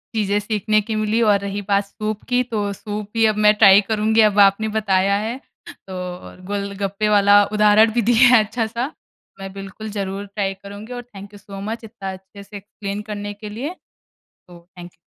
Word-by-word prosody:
चीज़ें 205 -1 +1
सीखने 215 0 0
की 220 +1 -4
मिली 215 +2 0
और 210 -3 +4
रही 200 +1 -4
बात 200 0 +1
सूप 215 +1 -5
की, 250 0 +2
तो 215 -5 -3
सूप 210 +1 -6
ही 225 0 +3
अब 210 - -7
मैं 210 - +7
ट्राय 200 -2 +7
करुँगी, 220 +1 +2
अब 205 0 -1
आपने 200 +2 +4
बताया 200 -2 +2
है 240 +3 -5 0.3
तो, 190 - -12
और 180 0 -8
गोलगप्पे 200 +1 -2
वाला 205 0 +5
उदाहरण 210 +1 +5
भी - - +4
दिया 240 +2 +6
है 220 - +5
अच्छा 225 +2 -3
सा। 235 +6 -4 0.5
मैं 195 0 -7
बिल्कुल, 195 +2 -8
ज़रूर 200 -1 -4
ट्राय 200 -1 -3
करुँगी 205 +4 -9
और 245 - -5
थैंक 200 +1 -11
यू 205 - -11
सो 195 0 -10
मच, 225 +3 -5
इतना 210 -4 -7
अच्छे 190 +2 -13
से 205 +1 -10
एक्सप्लेन 200 0 -7
करने 205 0 -5
के 210 - -5
लिए। 265 +11 -5 0.7
तो 175 -1 -14 0.2
थैंक 175 0 -10
यू। - - -32
205 Hz, 200 wpm, -20 LUFS, 200-215 Hz, 0.7 s, मैं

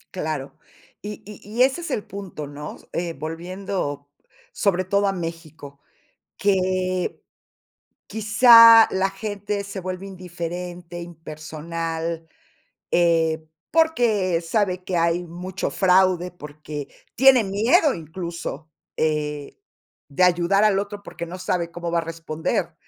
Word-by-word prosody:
Claro, 155 -6 -4 0.4
y 210 0 -7
y 210 0 -11
y 220 +5 +1
ese 270 +6 +1
es 335 - -5
el 215 - -2
punto, 190 -7 -7
¿no?, 145 +1 -8 0.2
eh, 170 0 -2
volviendo 165 -1 -5 0.4
sobre 185 -2 +1
todo 200 +2 +2
a 195 - +2
México, 160 -5 -7 0.6
que 185 -2 0 0.9
quizá 225 +1 +8
la 190 +1 +1
gente 205 0 -4
se 200 0 -7
vuelve 185 +1 -5
indiferente, 175 -1 -6
impersonal, 165 0 -5 0.6
eh, 165 -2 +2 0.2
porque 230 - +2
sabe 185 +1 0
que 180 -1 -2
hay 170 +1 +1
mucho 180 +2 -4
fraude, 185 -1 +3
porque 150 -2 -8 0.3
tiene 260 -1 +6
miedo 235 - +3
incluso, 165 -2 -6 0.3
eh, 150 -2 -1 0.5
de 150 +6 +1
ayudar 180 +3 +3
al 205 -2 +4
otro 205 0 -5
porque 170 -3 -7
no 180 +2 -7
sabe 180 -2 -1
cómo 170 0 -5
va 170 - +2
a - - 0
responder, 165 -1 -3
180 Hz, 120 wpm, -23 LUFS, 165-200 Hz, 0.9 s, quizá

